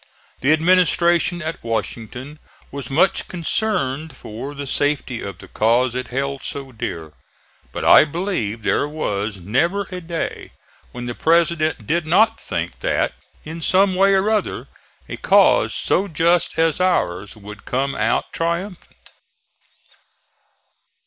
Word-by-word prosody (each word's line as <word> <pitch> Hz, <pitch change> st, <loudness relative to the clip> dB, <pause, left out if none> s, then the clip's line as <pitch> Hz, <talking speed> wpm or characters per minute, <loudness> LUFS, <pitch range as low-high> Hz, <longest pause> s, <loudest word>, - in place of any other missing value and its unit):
The 135 Hz, -, +2 dB
administration 175 Hz, +1 st, +3 dB
at 160 Hz, +1 st, -5 dB
Washington 115 Hz, +5 st, -4 dB, 0.3 s
was 140 Hz, -3 st, -6 dB
much 175 Hz, +7 st, +2 dB
concerned 160 Hz, -6 st, -2 dB
for 130 Hz, +7 st, -7 dB
the 140 Hz, 0 st, -5 dB
safety 140 Hz, -3 st, -1 dB
of 100 Hz, -, -6 dB
the -, -, -13 dB
cause 120 Hz, +3 st, +2 dB
it 125 Hz, 0 st, -3 dB
held 135 Hz, +2 st, -3 dB
so 135 Hz, -2 st, -5 dB
dear. 80 Hz, -9 st, -6 dB, 0.6 s
But -, -, -4 dB
I -, -, +8 dB
believe 145 Hz, -, -3 dB
there 145 Hz, -, +1 dB
was 105 Hz, -9 st, -3 dB
never 170 Hz, -, 0 dB
a 180 Hz, 0 st, -5 dB
day 165 Hz, 0 st, -5 dB, 0.4 s
when 120 Hz, 0 st, -7 dB
the 120 Hz, -, -3 dB
President 160 Hz, -4 st, +1 dB
did 165 Hz, +5 st, 0 dB
not 220 Hz, +7 st, +4 dB
think -, -, -4 dB
that, -, -, 0 dB, 0.3 s
in 160 Hz, +2 st, -7 dB
some 190 Hz, +3 st, +3 dB
way 195 Hz, +1 st, +4 dB
or 190 Hz, +2 st, +2 dB
other, 215 Hz, -, -1 dB, 0.4 s
a -, -, -6 dB
cause -, -, +4 dB
so 200 Hz, -, +1 dB
just 170 Hz, +1 st, +1 dB
as 165 Hz, +1 st, +2 dB
ours 105 Hz, -, 0 dB
would 105 Hz, +1 st, -11 dB
come 135 Hz, +2 st, -1 dB
out 110 Hz, +2 st, 0 dB
triumphant. 170 Hz, +3 st, -4 dB
150 Hz, 135 wpm, -21 LUFS, 120-175 Hz, 0.6 s, I